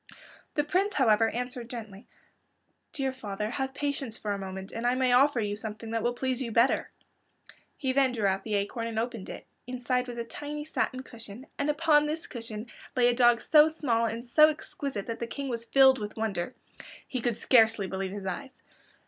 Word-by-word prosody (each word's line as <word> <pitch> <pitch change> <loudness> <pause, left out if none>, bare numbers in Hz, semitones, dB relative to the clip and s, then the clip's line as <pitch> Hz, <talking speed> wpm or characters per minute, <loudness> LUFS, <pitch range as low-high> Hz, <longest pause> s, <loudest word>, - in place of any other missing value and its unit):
The 295 - +2
Prince, 375 +6 0
however, 225 -4 +4
answered 245 0 -4
gently, 220 -4 -8 0.8
"Dear 270 -2 -2
father, 210 -4 -4
have 265 +1 -3
patience 280 -5 -3
for 210 - -3
a - - -2
moment 190 0 -6
and 230 +1 -2
I 245 - +3
may 255 -1 +2
offer 270 0 +5
you 205 -2 -1
something 220 +1 -6
that 230 0 0
will 240 +2 0
please 260 0 -1
you 235 -3 -3
better." 235 +4 +3 0.9
He 265 -3 -1
then 270 -1 +4
drew 225 -4 -1
out 195 0 +1
the 215 -2 -2
acorn 205 +3 -1
and 225 -1 -5
opened 230 -3 -3
it. - - -8 0.2
Inside 250 0 -1
it - - -18
was 240 -1 -6
a 235 - -2
tiny 295 +5 -6
satin 260 -4 -2
cushion, 230 0 -10
and 285 +1 0
upon 300 -1 +4
this 315 +2 -3
cushion 225 -2 -6 0.3
lay 245 -1 +5
a - - +3
dog 240 -1 +5
so 305 0 +6
small 245 -8 0
and 230 +2 -4
so 305 +5 +6
exquisite 280 -7 -5
that 230 -1 -5
the 235 - -3
King 275 +3 -5
was 230 -1 -3
filled 265 0 +6
with 210 +1 -6
wonder. 215 -1 -2 0.5
He 255 - -3
could 235 -2 0
scarcely 225 -5 +4
believe 190 +1 -3
his 200 -1 -6
eyes. 260 +9 -5
240 Hz, 200 wpm, -29 LUFS, 220-265 Hz, 0.9 s, so